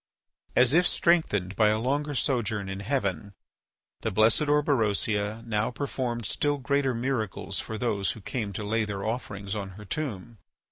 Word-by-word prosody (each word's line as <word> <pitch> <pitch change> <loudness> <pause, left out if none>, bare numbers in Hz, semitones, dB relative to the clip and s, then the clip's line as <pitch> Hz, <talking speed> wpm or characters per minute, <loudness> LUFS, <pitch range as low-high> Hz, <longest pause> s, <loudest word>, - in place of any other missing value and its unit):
As 125 +2 +5
if 175 +2 +5
strengthened 105 - +2
by 110 - +4
a 105 0 +3
longer 145 +5 -1
sojourn 110 -7 0
in 95 0 -4
heaven, 100 - -2 0.6
the - - -1
blessed 110 +8 +3
Orberosia 110 -6 +1
now 110 -2 0
performed 125 -3 -3
still 145 +8 +1
greater 140 -1 +1
miracles 115 -5 -2
for 110 - -4
those 105 -4 0
who 110 - -11
came 105 0 -3
to 105 - -4
lay 110 +2 +1
their 100 -2 -4
offerings 105 -4 -3
on 100 -3 -4
her 105 - -10
tomb. 115 -4 -4
110 Hz, 155 wpm, -27 LUFS, 105-135 Hz, 0.6 s, As